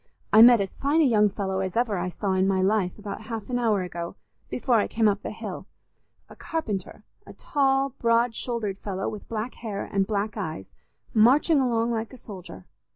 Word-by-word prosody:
I 215 - +9
met 240 0 +9
as 195 -2 -2
fine 285 +4 +1
a - - +5
young 210 -5 +4
fellow 190 -1 -3
as 190 +1 -3
ever 235 -4 +1
I 180 0 -2
saw 195 +1 -2
in 190 0 +2
my 195 -1 +1
life, 195 -2 +1
about 210 0 -7
half 225 +1 -6
an 245 - 0
hour 215 -5 +1
ago, 170 0 -6 0.3
before 245 -1 +1
I 210 - +2
came 225 -1 +2
up 205 0 +1
the - - -5
hill—a - - -11
carpenter, 215 - -4 0.2
a - - -10
tall, 275 -1 +1
broad 230 0 +2
shouldered 220 -5 -3
fellow 195 -2 -4
with 210 - -7
black 230 +2 -3
hair 210 -4 -5
and 195 -1 0
black 210 0 -2
eyes, 155 - -5 0.4
marching 275 +8 +5
along 235 -3 +1
like 225 +1 -3
a - - -10
soldier. 180 - -10
215 Hz, 195 wpm, -26 LUFS, 195-235 Hz, 0.4 s, I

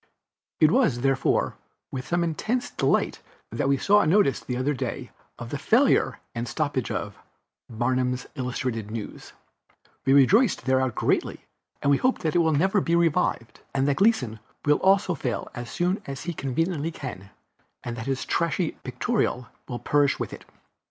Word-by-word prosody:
It 155 0 +5
was, 160 - +2
therefore, 135 0 +1 0.3
with 130 -1 -6
the 175 - +1
most 175 - +2
intense 235 +10 -2
delight - - 0 0.3
that 135 - -1
we 140 - +3
saw 205 +8 +4
a - - +1
notice 170 -5 +3
the 125 - -4
other 135 +4 0
day 130 - -4 0.3
of - - -8
the - - -3
failure - - +3
and 115 +1 -3
stoppage 140 0 -2
of - - -4 0.5
Barnum's 125 +2 -1
Illustrated 125 -5 -3
News; 110 -1 -7 0.7
we 135 - +3
rejoiced 185 - +4
thereat 130 -2 +1
greatly, - - -1 0.4
and 140 - +3
we 140 - +5
hope 255 +1 +1
that 155 - +1
it - - +5
will 160 -1 +3
never 190 +7 +2
be 170 -1 +1
revived, 165 -9 +1 0.2
and 135 0 +2
that 145 - +1
Gleason 135 - +2 0.3
will 150 0 +4
also 195 -1 +3
fail 125 -7 -3
as 120 0 -6
soon 180 +2 -1
as 135 -1 -6
he 175 - -3
conveniently 160 +3 -1
can, 130 - -8 0.5
and 120 - -4
that 115 +1 -6
his 135 -1 -2
trashy 170 0 0
Pictorial 125 - -1 0.2
will 120 - -4
perish 145 +2 +2
with - - -4
it. - - -10
140 Hz, 170 wpm, -25 LUFS, 125-170 Hz, 0.7 s, It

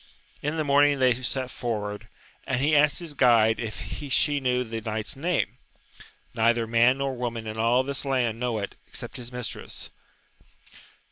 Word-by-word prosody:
In 150 +3 -2
the 155 - +1
morning 145 0 +4
they 130 -2 +3
set 130 0 -2
forward, 105 -3 -4 0.4
and 130 - 0
he 150 +3 +3
asked 150 0 +4
his 170 -4 -3
guide 115 -4 +4
if 115 -2 -4 0.3
she 145 +2 +3
knew 125 -1 +1
the 115 -1 -5
knight's 110 +4 -3
name? 165 +5 -1 0.3
— - - -21
Neither 115 0 +2
man 120 +3 +4
nor 135 -1 -2
woman 120 -2 -4
in 110 0 -5
all 120 +3 +3
this 140 +1 -3
land 125 -5 0
know 120 -2 -1
it, 100 -2 -4
except - - -6
his 120 0 -7
mistress. 125 -1 -6
125 Hz, 165 wpm, -26 LUFS, 115-140 Hz, 0.4 s, morning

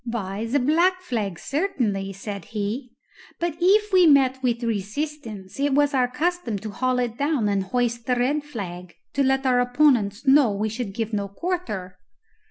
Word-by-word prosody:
"Why, 220 -2 -4
the 260 +5 +1
black 340 +8 +3
flag, 210 - -3
certainly," 240 - -1
said 200 +1 -7
he; 220 +4 -4 0.5
"but 340 -2 -1
if 415 +3 +3
we 365 -2 +7
met 265 -3 +4
with 240 -2 0
resistance, 225 -1 -4
it 280 -1 +2
was 290 0 +3
our 255 -2 +3
custom 305 - -1
to 215 +2 -6
haul 255 +5 0
it 240 0 -2
down 285 -6 +1
and 200 -1 +1
hoist 235 +2 -1
the 250 - +2
red 275 +5 0
flag, 180 - -7 0.2
to 280 - +1
let 270 0 +1
our 250 -1 +3
opponents 245 -4 +2
know 270 -4 +5
we 210 +2 -1
should 220 -3 -5
give 225 -1 -3
no 200 -1 -1
quarter." 210 - -4
245 Hz, 175 wpm, -24 LUFS, 205-290 Hz, 0.5 s, we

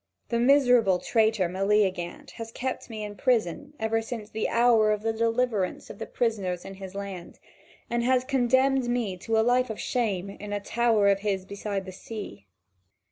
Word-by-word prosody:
The 235 - 0
miserable 245 -7 +5
traitor 220 -1 +2
Meleagant 190 -1 0
has 225 -1 -6
kept 255 +2 -4
me 215 -2 -5
in 205 0 -6
prison 250 - 0
ever 225 0 0
since 225 -2 -7
the 220 - -1
hour 230 -2 +4
of 210 0 -1
the 225 0 0
deliverance 230 -3 0
of - - -12
the - - -5
prisoners 195 -7 -1
in 195 - -7
his 190 0 -9
land, 195 -3 -7 0.5
and 235 0 0
has 255 0 +3
condemned 260 0 +2
me 235 -6 -1
to 225 +5 -1
a 220 - +3
life 250 +1 +3
of 220 - -5
shame 200 -6 -1
in 205 +1 -7
a 205 - -1
tower 225 -1 +2
of 195 0 +3
his 195 -2 -2
beside 200 -1 -4
the 190 - -7
sea. 185 - -8
220 Hz, 180 wpm, -27 LUFS, 195-240 Hz, 0.5 s, miserable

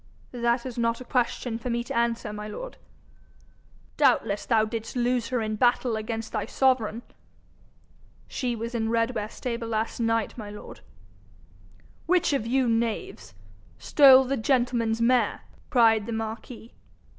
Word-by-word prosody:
'That 235 0 0
is 245 -2 -5
not 230 0 0
a 255 - -9
question 245 -2 -1
for 250 - -5
me 235 0 -1
to - - -6
answer, 235 -2 -1
my 210 0 -6
lord.' - - -7 1.2
'Doubtless 245 -7 +2
thou 220 -2 +3
didst 225 +1 -6
lose 245 -1 0
her 245 -1 -1
in 215 0 -2
battle 240 +1 +2
against 225 +1 -4
thy - - -2
sovereign.' 245 -4 +1 1.2
'She 245 -2 -2
was 230 +2 -5
in 225 -2 -1
Redware 230 -2 0
stable 235 -1 -5
last 225 +1 -2
night, 225 -1 0
my 210 -2 -7
lord.' 210 0 -10 1.3
'Which 355 -3 +2
of 230 -5 -1
you, 260 +1 +2
knaves, 225 - -2 0.4
stole 265 - +7
the 270 +1 -2
gentleman's 240 -2 +1
mare?' 250 +1 +2 0.3
cried 225 -4 +4
the 230 - -3
marquis. 225 +1 -6
235 Hz, 145 wpm, -26 LUFS, 225-250 Hz, 1.3 s, stole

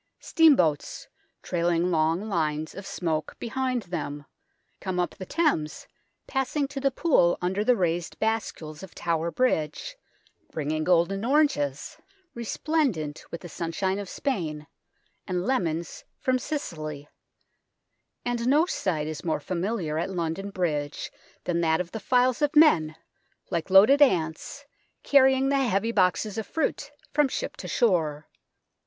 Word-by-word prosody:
Steamboats, 225 - +3 0.4
trailing 175 0 +1
long 165 +5 +1
lines 155 -5 -1
of 195 0 -8
smoke 160 -3 -2
behind 255 0 -2
them, 150 -5 -5 0.5
come 185 -2 -3
up 175 - 0
the 185 - -9
Thames, 295 - 0 0.4
passing 270 +1 -1
to 280 -1 -5
the 275 0 +2
Pool 265 - +3
under 190 +3 -1
the 250 +3 +4
raised 175 -3 -1
bascules 215 -9 -2
of 190 -3 -11
Tower 170 -1 -1
Bridge, 210 - -1 0.6
bringing 155 0 -2
golden 180 +4 +2
oranges, 235 - +1 0.4
resplendent 235 - -1
with 170 - -7
the 175 - -8
sunshine 175 +4 -2
of 200 -2 -6
Spain, 160 - -3 0.6
and 180 -1 -1
lemons 170 -10 -1
from 255 -2 +1
Sicily; 155 - -5 1.2
and 240 -1 -1
no 295 +5 +5
sight 175 - -1
is 155 -1 -5
more 160 -3 0
familiar 175 -1 -2
at 170 - -2
London 180 +2 -3
Bridge 150 -7 -2 0.3
than 170 -1 0
that 160 -1 +2
of 175 -1 -4
the 220 - -5
files 250 +5 +2
of 295 +1 +1
men, 165 - +5 0.6
like 170 -1 -2
loaded 215 +10 +7
ants, 180 - +1 0.4
carrying 265 -1 +4
the 280 0 +2
heavy 230 -3 +1
boxes 200 +1 +1
of 220 - -5
fruit 320 - -2 0.2
from 295 -1 +4
ship - - -4
to - - -7
shore. 160 - +1
185 Hz, 135 wpm, -26 LUFS, 160-255 Hz, 1.2 s, loaded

